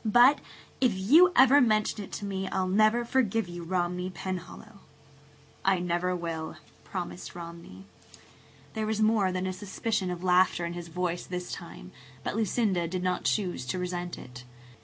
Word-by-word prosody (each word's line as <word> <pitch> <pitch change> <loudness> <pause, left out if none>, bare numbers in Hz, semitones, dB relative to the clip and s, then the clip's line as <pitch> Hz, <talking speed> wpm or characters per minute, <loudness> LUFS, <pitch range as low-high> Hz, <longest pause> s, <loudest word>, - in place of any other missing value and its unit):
But 245 +6 +6 0.4
if 245 -6 +3
you 310 - +6
ever 270 +2 +7
mention 215 -3 +1
it - - -11
to 205 - -4
me 195 -1 -3
I'll 185 - -1
never 215 +5 +3
forgive 225 -4 +1
you, 175 0 -7
Romney 180 +1 -1
Penhallow!" 185 +3 -7 0.8
"I 195 -1 +3
never 180 +1 0
will," 165 -2 -4 0.3
Romney 180 -2 -4
promised. - - -15 1.4
There 220 -1 -2
was 215 0 -1
more 215 -3 +3
than 185 0 -2
a 185 - -2
suspicion 195 0 -2
of 180 0 -5
laughter 180 -1 +3
in 170 - -4
his 175 -1 -7
voice 175 +1 -3
this 180 0 -5
time, - - -9 0.3
but - - -3
Lucinda 205 -5 +1
did 180 +1 -3
not 180 -1 -1
choose 185 -10 0
to 155 - -2
resent 180 -1 -4
it. 125 0 -11
185 Hz, 160 wpm, -28 LUFS, 175-215 Hz, 1.4 s, ever